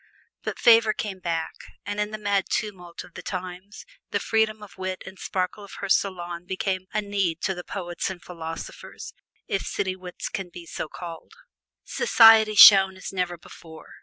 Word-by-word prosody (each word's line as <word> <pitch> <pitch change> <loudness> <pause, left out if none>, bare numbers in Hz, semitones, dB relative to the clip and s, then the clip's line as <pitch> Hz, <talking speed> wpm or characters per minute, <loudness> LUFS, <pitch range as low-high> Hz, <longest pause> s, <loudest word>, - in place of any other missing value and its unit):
But - - -4
favor 225 -2 +5
came 200 -3 -5
back, 165 -2 -3 0.3
and 205 0 -4
in 210 0 0
the 215 - -5
mad 200 -2 0
tumult 180 -5 -4
of 180 - -17
the - - -8
times 185 +2 -7 0.2
the - - -1
freedom 220 -1 0
of 205 - -13
wit 185 0 -4
and 190 0 -11
sparkle 185 +2 -3
of 200 - -12
her 200 - -6
salon 175 -3 -1
became 185 0 -2
a 215 0 -1
need 195 -5 -1
to 190 - 0
the 180 -1 -8
poets 175 -2 -4
and 190 -2 -7
philosophers, 165 -2 -8 0.3
if 195 - -1
city 190 -2 -2
wits 180 -1 -7
can 190 -2 -5
be 175 0 -11
so 160 - -5
called. 165 - -9 0.5
Society 225 - +6
shone 195 -2 +9
as 190 - -8
never 180 -2 -2
before. 160 -1 -14
190 Hz, 175 wpm, -25 LUFS, 175-205 Hz, 0.5 s, shone